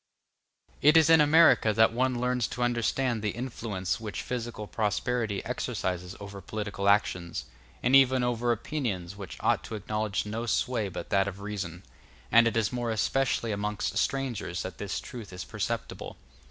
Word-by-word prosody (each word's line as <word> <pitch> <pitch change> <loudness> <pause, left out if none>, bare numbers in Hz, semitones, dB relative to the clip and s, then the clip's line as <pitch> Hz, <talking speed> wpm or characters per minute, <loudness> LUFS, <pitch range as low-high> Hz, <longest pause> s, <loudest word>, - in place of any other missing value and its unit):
It 150 +3 +7
is 160 0 +6
in 160 -1 +8
America 150 -7 +6
that 110 +1 +4
one 125 0 +1
learns 125 -2 +1
to 125 - -3
understand 120 0 0
the 105 - 0
influence 115 -7 -3
which 110 -2 -5
physical 120 -3 -4
prosperity 110 0 -1
exercises 90 +1 -3
over 100 -1 -8
political 100 0 -2
actions, 95 -4 +1 0.4
and 125 +2 +4
even 130 -2 +5
over 120 0 +1
opinions 110 - -3
which 100 -3 -8
ought - - +2
to 110 - -5
acknowledge 105 0 -2
no 115 +3 -4
sway 115 -3 0
but 90 -1 -7
that 100 0 +3
of 100 0 -5
reason; 95 -4 -5 0.5
and 115 0 +7
it 115 - 0
is 110 +1 +1
more 120 -1 -2
especially 115 +1 0
amongst 105 0 -2
strangers 120 -10 -2
that 95 -3 -7
this 100 -1 -3
truth 115 -7 -9
is 90 0 -6
perceptible. 115 +2 -4
110 Hz, 160 wpm, -28 LUFS, 100-125 Hz, 0.5 s, in